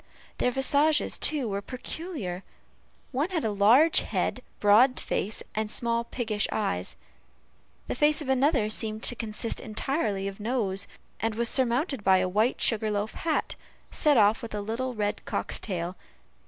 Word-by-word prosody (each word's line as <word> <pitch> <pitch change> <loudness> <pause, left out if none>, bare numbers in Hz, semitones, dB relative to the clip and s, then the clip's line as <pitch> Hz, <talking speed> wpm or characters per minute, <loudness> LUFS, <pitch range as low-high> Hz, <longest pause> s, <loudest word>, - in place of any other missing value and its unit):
Their - - +2
visages, 285 +4 +2
too, 285 -6 +1
were 200 -1 -2
peculiar; 250 - -6 0.7
one 280 +6 0
had 340 -8 -2
a 220 - +1
large 230 +11 +5
head, - - -2 0.2
broad 230 +6 +5
face, 210 +3 -2
and 215 0 -2
small 235 +1 -1
piggish 220 -4 -2
eyes; 90 - -2 0.9
the - - -3
face 295 +3 +3
of 295 - -4
another 265 -3 +2
seemed 215 0 -1
to 245 - 0
consist 225 0 -2
entirely 215 -4 -2
of 195 +1 -7
nose, 210 -4 -1 0.3
and 225 -1 -1
was 235 0 +2
surmounted 260 - 0
by 190 -1 +5
a 185 0 +1
white 215 +7 +1
sugar 220 -2 +2
loaf 210 +1 -2
hat, 325 -2 -1 0.4
set 295 -4 +3
off 215 +2 +4
with 230 -3 -6
a 205 - -2
little 240 +4 -3
red 210 -1 -2
cock's - - -2
tail. 180 -3 -4
225 Hz, 155 wpm, -27 LUFS, 205-265 Hz, 0.9 s, large